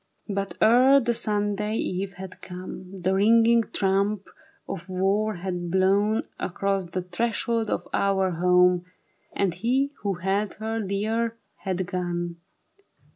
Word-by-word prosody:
But 200 Hz, -1 st, -3 dB
ere 255 Hz, +5 st, +6 dB
the 240 Hz, -2 st, 0 dB
Sunday 210 Hz, -1 st, -1 dB
eve 195 Hz, -1 st, -2 dB
had 185 Hz, 0 st, -10 dB
come, 185 Hz, 0 st, -8 dB
The 190 Hz, +1 st, +2 dB
ringing 230 Hz, +4 st, +5 dB
trump 200 Hz, 0 st, +1 dB, 0.4 s
of 170 Hz, +3 st, -6 dB
war 200 Hz, +3 st, +1 dB
had 175 Hz, -1 st, -4 dB
blown 195 Hz, +4 st, +2 dB, 0.2 s
Across 195 Hz, 0 st, -1 dB
the 180 Hz, +1 st, -3 dB
threshold 225 Hz, +4 st, -1 dB
of -, -, -2 dB
our 190 Hz, -1 st, +2 dB
home. 180 Hz, +1 st, +4 dB, 0.5 s
And 195 Hz, -3 st, 0 dB
he 255 Hz, +9 st, 0 dB
who 200 Hz, -2 st, -1 dB
held 195 Hz, +3 st, -1 dB
her 220 Hz, +1 st, -3 dB
dear 220 Hz, +3 st, -1 dB, 0.2 s
had 185 Hz, -1 st, -2 dB
gone. 175 Hz, -1 st, -3 dB
195 Hz, 130 wpm, -25 LUFS, 185-215 Hz, 0.5 s, ere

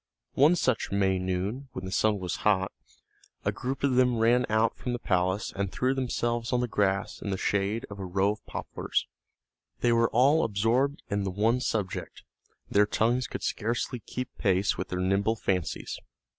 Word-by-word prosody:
One 150 Hz, +6 st, +5 dB
such 130 Hz, -8 st, 0 dB
May 95 Hz, -1 st, +2 dB
noon, 95 Hz, +9 st, -2 dB
when 95 Hz, -, -6 dB
the 95 Hz, -, -5 dB
sun 105 Hz, +2 st, +2 dB
was 90 Hz, -2 st, -3 dB
hot, 95 Hz, -3 st, +2 dB, 0.7 s
a -, -, +2 dB
group 130 Hz, +2 st, -4 dB
of 140 Hz, -2 st, +3 dB
them 125 Hz, -2 st, +4 dB
ran 120 Hz, +2 st, +3 dB
out 110 Hz, +1 st, +2 dB
from 125 Hz, -, -4 dB
the -, -, -1 dB
palace, 95 Hz, -2 st, 0 dB
and 100 Hz, -1 st, -2 dB
threw 130 Hz, +1 st, +1 dB
themselves 120 Hz, -3 st, -1 dB
on 125 Hz, -, +2 dB
the 125 Hz, -, 0 dB
grass 100 Hz, -2 st, 0 dB
in 100 Hz, -, -4 dB
the 95 Hz, -, -1 dB
shade 100 Hz, +4 st, 0 dB
of 100 Hz, -1 st, -9 dB
a 95 Hz, -, -4 dB
row 95 Hz, +3 st, +1 dB
of 105 Hz, -, -8 dB
poplars. -, -, -2 dB, 0.8 s
They 120 Hz, -, +3 dB
were 115 Hz, 0 st, +3 dB
all 140 Hz, +7 st, +4 dB
absorbed 115 Hz, +7 st, +1 dB
in 100 Hz, 0 st, 0 dB
the 95 Hz, -, -1 dB
one 110 Hz, +6 st, +2 dB
subject; 105 Hz, -7 st, -3 dB, 0.4 s
their 105 Hz, +1 st, +3 dB
tongues 120 Hz, +4 st, +1 dB
could -, -, -6 dB
scarcely 120 Hz, +2 st, -2 dB
keep 125 Hz, +3 st, -6 dB
pace 95 Hz, -1 st, +2 dB
with 95 Hz, -, -4 dB
their 90 Hz, -, -3 dB
nimble 100 Hz, +4 st, +2 dB
fancies. 90 Hz, -6 st, -2 dB
110 Hz, 185 wpm, -28 LUFS, 95-125 Hz, 0.8 s, One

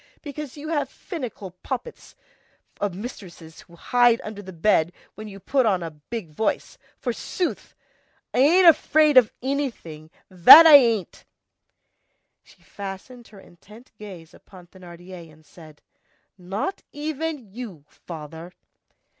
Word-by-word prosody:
Because 295 Hz, -1 st, -8 dB
you 305 Hz, +2 st, -8 dB
have 300 Hz, -3 st, -2 dB
finical 245 Hz, -, -8 dB
poppets 270 Hz, -, -7 dB, 0.6 s
of 200 Hz, -3 st, -3 dB
mistresses 180 Hz, -7 st, -10 dB
who 170 Hz, -, -19 dB
hide 240 Hz, +5 st, +2 dB
under 215 Hz, -1 st, -8 dB
the 190 Hz, -1 st, -11 dB
bed 170 Hz, -1 st, +1 dB, 0.2 s
when 215 Hz, 0 st, -10 dB
you 200 Hz, -1 st, -11 dB
put 255 Hz, +5 st, 0 dB
on 185 Hz, -4 st, 0 dB
a 165 Hz, -, -6 dB
big 160 Hz, +4 st, -9 dB
voice, 220 Hz, +9 st, -3 dB, 0.2 s
forsooth! 265 Hz, +8 st, -5 dB, 0.6 s
I -, -, 0 dB
ain't 345 Hz, +7 st, +5 dB
afraid 310 Hz, -2 st, +4 dB
of 250 Hz, -4 st, +6 dB
anything, 240 Hz, -, -5 dB, 0.2 s
that 190 Hz, -, +9 dB
I 320 Hz, -, +8 dB
ain't!" 230 Hz, -9 st, +4 dB, 1.2 s
She -, -, -24 dB
fastened 200 Hz, +5 st, -10 dB
her 205 Hz, -, -16 dB
intent 210 Hz, +7 st, -18 dB
gaze 185 Hz, -6 st, -12 dB
upon 185 Hz, -2 st, -17 dB
Thénardier 175 Hz, -1 st, -13 dB
and 155 Hz, 0 st, -22 dB
said:— 155 Hz, -3 st, -17 dB, 0.5 s
"Not 195 Hz, -, -5 dB
even 310 Hz, +1 st, -4 dB
of 215 Hz, -8 st, -20 dB
you, 200 Hz, -, -9 dB
father!" 160 Hz, +1 st, -11 dB
205 Hz, 130 wpm, -23 LUFS, 175-265 Hz, 1.2 s, that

